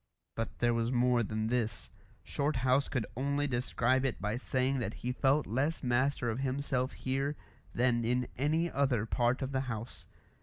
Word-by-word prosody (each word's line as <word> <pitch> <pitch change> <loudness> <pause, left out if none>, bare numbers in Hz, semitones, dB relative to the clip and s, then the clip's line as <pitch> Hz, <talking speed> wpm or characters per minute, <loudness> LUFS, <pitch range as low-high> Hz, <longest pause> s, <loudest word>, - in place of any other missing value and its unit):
But 115 - -4
there 120 -1 +2
was 115 +1 0
more 125 -1 +3
than 110 0 -2
this. 110 - -1 0.3
Shorthouse 140 -2 +1
could 125 -6 -1
only 140 +3 0
describe 125 0 +1
it 135 -3 -1
by 105 +1 -1
saying 130 +1 0
that 110 -3 -3
he 125 - +1
felt 135 +3 +2
less 140 +9 -1
master 125 0 +1
of 110 - -3
himself 130 -1 -1
here 135 +3 -1 0.4
than 120 -1 +2
in 125 +1 +1
any 155 +5 +1
other 130 -6 +1
part 120 +3 +1
of 135 - -3
the 130 -1 0
house. 115 0 -6
125 Hz, 165 wpm, -32 LUFS, 120-135 Hz, 0.4 s, more